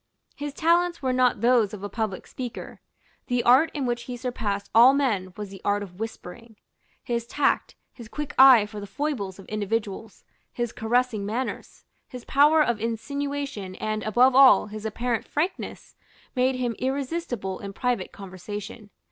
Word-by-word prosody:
His 290 0 -5
talents 340 0 +2
were 260 -1 +1
not 250 -4 +2
those 230 -3 +3
of 200 - -11
a - - -2
public 215 -3 -4
speaker. 245 -3 -8 0.5
The 245 -1 0
art 265 +7 +5
in 280 -3 -1
which 240 -1 -2
he 250 -1 -6
surpassed 220 -5 -3
all 245 +4 +7
men 210 -10 0
was 210 -1 -6
the 195 - -11
art 205 0 0
of 180 -1 -12
whispering. 225 +1 -8 0.5
His 235 -1 -3
tact, 290 - 0 0.2
his 235 -3 -11
quick 295 +2 -5
eye 260 -5 +8
for 210 0 -8
the 205 - -7
foibles 200 -5 -3
of 195 - -12
individuals, 215 0 -4 0.3
his 240 -1 -3
caressing 235 -1 0
manners, 230 +6 -5 0.2
his 250 -2 -10
power 300 +3 +5
of 235 -6 -1
insinuation, 275 -3 -4
and, 215 +1 -3
above 245 +5 +4
all, 260 -6 +7
his 215 +1 -6
apparent 235 +1 -2
frankness, 325 +6 -4 0.4
made 255 +1 +2
him 245 -2 -2
irresistible 260 - -3
in 200 - -7
private 240 -2 -2
conversation. 200 +3 -8
235 Hz, 160 wpm, -25 LUFS, 205-260 Hz, 0.5 s, eye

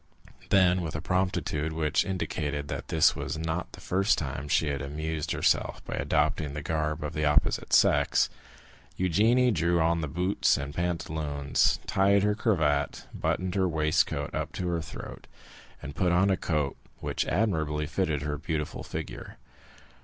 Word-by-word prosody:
Then, 95 -2 +4
with 80 -3 -4
a - - -1
promptitude 90 -4 -1
which 80 -1 +1
indicated 75 -6 -3
that - - -5
this 80 - +4
was - - -4
not 80 +2 -3
the - - -10
first 95 +3 +1
time 70 -1 -4
she 75 +1 +2
had 70 -2 -2
amused 80 +2 -3
herself - - +1
by - - -5
adopting 75 -3 0
the 75 - -4
garb 75 0 -1
of 75 +1 -4
the 75 0 -1
opposite 75 0 +2
sex, - - +4 0.7
Eugénie 110 +8 +3
drew 85 0 +2
on 85 +1 +2
the 75 - -2
boots 90 +7 +1
and 70 +1 -5
pantaloons, 80 -4 0
tied 100 +1 +3
her 105 0 +3
cravat, 80 - 0
buttoned 95 -1 -1
her 95 -2 +2
waistcoat 75 -2 0
up - - -3
to 90 -1 -2
the 85 - -1
throat, 80 - -9 0.6
and 70 -1 -7
put 90 -1 +1
on 95 +3 +3
a - - +3
coat 75 -6 -1 0.2
which - - -2
admirably 80 -6 0
fitted 80 -3 -1
her 75 -1 -3
beautiful 80 -2 -3
figure. - - -7
80 Hz, 160 wpm, -28 LUFS, 75-90 Hz, 0.7 s, Then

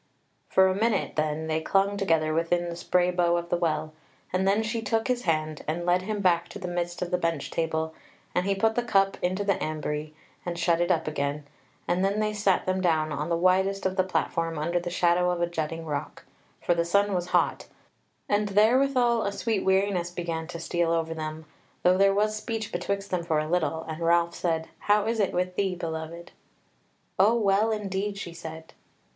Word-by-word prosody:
For 190 0 +5
a 190 - +2
minute 215 +1 0
then 155 0 -1
they 160 0 -1
clung 195 +4 +2
together 165 -6 +1
within 170 +2 0
the 170 - -5
spray 180 +1 +1
bow 175 -1 +2
of 170 0 -4
the 175 - +2
Well, 155 -2 -1 0.4
and 190 +1 +1
then 205 +3 +3
she 225 +1 -2
took 225 +2 0
his 250 -2 -1
hand 155 -2 -1
and 170 +3 -2
led 180 +1 +3
him 210 +2 -3
back 175 -3 +2
to - - -8
the 190 -3 -5
midst 175 0 -2
of 175 - -5
the 180 - +1
bench 165 -4 -2
table, 160 -1 -1 0.4
and 180 +2 0
he 200 - +2
put 220 +3 +2
the 245 - +1
cup 195 -4 +2
into 185 +3 0
the 200 -1 0
ambrye, 155 0 -3 0.3
and 175 -1 -4
shut 170 -1 +2
it 175 - +1
up 165 -3 +1
again, 145 -1 -2 0.4
and 175 +2 +1
then 200 +2 +1
they 215 0 0
sat 205 -3 +1
them 185 0 0
down 160 -3 +1
on 150 +2 -3
the 170 - +1
widest 190 +2 +2
of 190 0 0
the 185 - +3
platform 165 -3 -1
under 170 +4 0
the 175 0 -4
shadow 175 0 +2
of 175 -1 -1
a 175 - +2
jutting 165 -1 -4
rock; 145 -2 -5 0.4
for - - +3
the 170 0 +1
sun 200 +4 +2
was 175 -1 -1
hot; - - +1 0.6
and 205 0 +1
therewithal 240 +3 +3
a 200 - -1
sweet 220 0 -1
weariness 190 -2 +1
began 170 -2 -4
to 170 -1 -7
steal 170 0 0
over 165 -1 0
them, 155 0 -6 0.4
though 180 +1 +4
there 195 0 +6
was 215 +1 +1
speech 220 0 -4
betwixt 200 0 -3
them 180 -2 0
for 165 -2 0
a 155 0 0
little, 160 -1 0
and 160 +1 -7
Ralph 170 0 +3
said: 165 -2 -1
"How 205 0 +2
is 225 0 -1
it 200 - +2
with 180 0 -1
thee, 190 -2 0
beloved?" 165 0 -6 0.9
"O 210 +5 +5
well 210 0 +2
indeed," 200 -1 -2
she 175 -3 -6
said. 160 -1 -9
175 Hz, 210 wpm, -27 LUFS, 165-200 Hz, 0.9 s, there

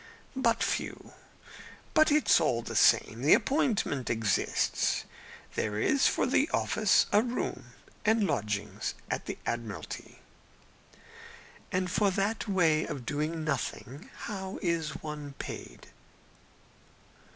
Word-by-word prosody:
"But 235 -3 +2
few. - - -3 0.8
But 310 -1 +5
it's 300 - +4
all 120 -7 +1
the - - -6
same. 115 +2 +4
The 145 - +7
appointment 230 - 0
exists. 110 -3 0 0.5
There 105 -1 -2
is 270 - +3
for - - +1
the 270 +4 +2
office 215 -3 +3
a 205 - +5
room 245 +1 -3 0.4
and 220 -1 +3
lodgings 105 - -2 0.2
at - - -3
the - - -4
Admiralty." 115 -3 -5 1.5
"And 185 0 0
for 205 +1 +3
that 200 +5 -1
way 165 -5 +3
of 140 -6 -6
doing 155 +3 -2
nothing, 145 - -4
how 190 -3 -5
is 170 -3 -1
one 150 -2 -6
paid?" - - -8
165 Hz, 115 wpm, -30 LUFS, 135-215 Hz, 1.5 s, The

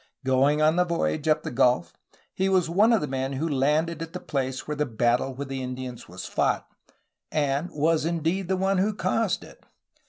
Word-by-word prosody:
Going 135 +3 +3
on 155 +2 +4
the 180 - +5
voyage 165 -3 -1
up 155 0 +3
the - - -4
gulf 125 +4 +2 0.4
he 190 +1 0
was 185 -3 +3
one 205 +8 +4
of 225 - +3
the 150 - -2
men 135 0 -2
who 145 +5 -1
landed 150 +3 +1
at 165 +1 -6
the 180 - -4
place 130 -4 -3
where 150 - -2
the 150 0 -1
battle 120 +3 +1
with 140 +1 -5
the 135 -1 -4
Indians 125 -1 -6
was 95 +2 -8
fought, - - 0 0.7
and 145 +2 0
was 155 +1 +1
indeed 170 +3 -1
the 190 0 0
one 190 0 +1
who 205 +2 +1
caused 220 -2 0
it. - - -15
150 Hz, 200 wpm, -26 LUFS, 130-170 Hz, 0.7 s, the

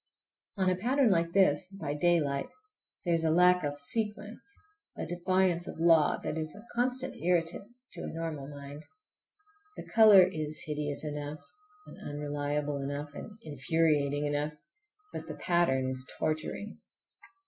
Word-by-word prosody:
On 190 -1 +1
a 185 - +3
pattern 250 +4 +2
like 170 -2 +1
this, 180 -5 +3
by 195 -7 -5
daylight, 150 -3 +1 0.6
there 175 - +2
is 165 -1 +1
a 160 - +2
lack 180 +2 +5
of 145 0 -2
sequence, 210 +6 -3 0.5
a - - -3
defiance 175 0 +1
of - - -7
law, 165 -2 +5
that 160 - -2
is 155 -1 -4
a 210 +2 -13
constant 255 +2 +1
irritant 175 +3 0 0.2
to - - -7
a - - -5
normal 160 -4 -5
mind. 145 +1 -9 0.9
The - - -7
color 215 -4 +8
is 155 -4 -3
hideous 150 -1 -3
enough, 150 0 -5 0.4
and - - -13
unreliable 145 0 -3
enough, 145 +1 -5
and 210 +7 -9
infuriating 145 0 +1
enough, 145 +1 -1 0.6
but 160 - -6
the 155 - -6
pattern 145 -5 +1
is 130 0 0
torturing. 155 +7 -3
160 Hz, 145 wpm, -30 LUFS, 145-185 Hz, 0.9 s, color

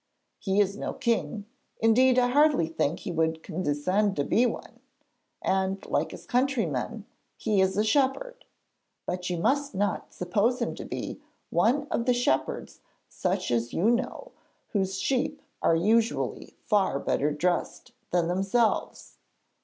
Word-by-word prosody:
He 195 0 0
is 200 0 +2
no - - -3
king 225 -2 -1 0.3
indeed 250 +3 +4
I 245 -1 +4
hardly 290 - +4
think 165 -1 -1
he - - -4
would 160 -1 0
condescend 185 +5 0
to 145 - 0
be 240 - +3
one - - -7 0.6
and, 190 0 0
like - - 0
his - - -10
countrymen, 225 - -1 0.3
he 210 -4 +1
is 190 +1 +1
a 210 - +3
shepherd. 290 - 0 0.6
But 180 0 -3
you 175 - -1
must 280 +8 0
not 200 0 -1
suppose 205 +7 0
him 235 - -1
to - - -8
be - - -5 0.3
one 280 +6 +2
of 235 - 0
the 250 - +4
shepherds 240 - -1 0.3
such - - -2
as 115 -1 +2
those 120 - -16
you 210 +7 +3
know, 260 - -2 0.4
whose 190 -3 -1
sheep 275 +5 0 0.2
are 165 - +4
usually 225 +7 0
far 195 -9 +2
better 145 +1 0
dressed 175 +4 -1 0.2
than 175 -2 +1
themselves. 195 +6 0
205 Hz, 145 wpm, -27 LUFS, 180-245 Hz, 0.6 s, indeed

